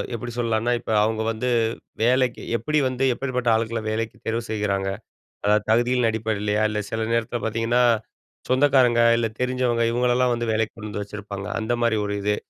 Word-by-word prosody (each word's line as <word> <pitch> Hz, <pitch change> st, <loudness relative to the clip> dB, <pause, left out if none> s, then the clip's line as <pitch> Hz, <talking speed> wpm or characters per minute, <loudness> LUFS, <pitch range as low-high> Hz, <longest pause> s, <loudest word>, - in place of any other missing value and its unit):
எப்பிடி 120 Hz, +1 st, -6 dB
சொல்லான்னா, 115 Hz, 0 st, 0 dB
இப்ப 110 Hz, -, -6 dB
அவுங்க 110 Hz, 0 st, 0 dB
வந்து 120 Hz, +3 st, -2 dB, 0.5 s
வேலைக்கு, 125 Hz, 0 st, +2 dB, 0.2 s
எப்பிடி 150 Hz, +7 st, 0 dB
வந்து 130 Hz, +1 st, -2 dB
எப்பேர்பட்ட 125 Hz, -2 st, -2 dB
ஆள்கள 115 Hz, 0 st, -1 dB
வேலைக்கி 110 Hz, +1 st, -3 dB
தேர்வு 115 Hz, +1 st, 0 dB
செய்றாங்க. 100 Hz, -3 st, -1 dB, 0.6 s
அதாவது 105 Hz, 0 st, +3 dB
தகுதிகளின் 120 Hz, +1 st, +3 dB
அடிப்படையிலயா! 105 Hz, -1 st, -1 dB
இல்ல 105 Hz, 0 st, -2 dB
சில 110 Hz, 0 st, -2 dB
நேரத்தில 115 Hz, +1 st, 0 dB
பாத்தீங்கன்னா, 115 Hz, +2 st, +1 dB, 0.7 s
சொந்தக்காரங்க 130 Hz, -3 st, +4 dB, 0.2 s
இல்ல 115 Hz, -, 0 dB
தெரிஞ்சவங்க 125 Hz, -2 st, +1 dB
இவங்களலாம் 125 Hz, +1 st, +2 dB
வந்து 120 Hz, 0 st, -3 dB
வேலைக்கு 110 Hz, 0 st, -1 dB
கொண்டு 110 Hz, -1 st, -7 dB
வந்து 105 Hz, 0 st, -4 dB
வச்சிருப்பாங்க 100 Hz, -1 st, -7 dB
அந்த 110 Hz, +2 st, -1 dB
மாதிரி 115 Hz, -2 st, +2 dB
ஒரு 100 Hz, -, -2 dB
இது. 105 Hz, 0 st, +1 dB
115 Hz, 160 wpm, -23 LUFS, 110-125 Hz, 0.7 s, சொந்தக்காரங்க